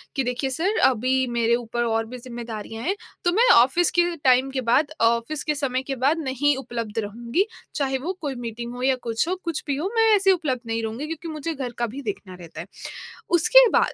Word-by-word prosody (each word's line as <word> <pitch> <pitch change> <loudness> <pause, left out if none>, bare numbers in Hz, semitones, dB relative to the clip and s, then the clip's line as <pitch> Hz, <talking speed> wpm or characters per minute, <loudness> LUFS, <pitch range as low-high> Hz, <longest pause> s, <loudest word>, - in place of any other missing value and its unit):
कि 270 - +1
देखिए 250 +2 -2
सर 360 - 0
अभी 260 +1 +2
मेरे 235 0 +2
ऊपर 240 0 -2
और 225 -1 0
भी 250 +3 -8
ज़िम्मेदारियाँ 235 -2 -7
हैं 380 +4 0 0.3
तो 350 - +4
मैं 465 +7 +4
ऑफिस 265 +9 +4
के - - +7 0.2
टाइम 255 +1 +4
के 265 -1 -2
बाद 290 +4 +3
ऑफिस 235 +6 +1
के 300 - -1
समय 260 -3 -1
के - - -1
बाद 300 +4 +3
नहीं 285 0 +1
उपलब्ध 230 -4 -4
रहूँगी 235 - -1 0.3
चाहे 270 -2 0
वो 370 - 0
कोई 285 -4 -3
मीटिंग 235 +1 -5
हो 250 - -7
या 265 0 +3
कुछ 230 +5 -1
हो 370 - 0
कुछ 335 -3 -3
भी 280 - 0
हो 340 +8 -2
मैं 450 -1 +5
ऐसे 390 -1 +4
उपलब्ध 300 -9 0
नहीं 225 0 -1
रहूँगी 225 +7 -4
क्योंकि 325 +1 -6
मुझे 310 +2 -3
घर 265 -4 -4
का 240 - 0
भी 280 - -5
देखना 205 -5 -6
रहता 170 -2 -10
है। - - -10 0.7
उसके - - +7
बाद - - +2
260 Hz, 220 wpm, -24 LUFS, 235-310 Hz, 0.7 s, के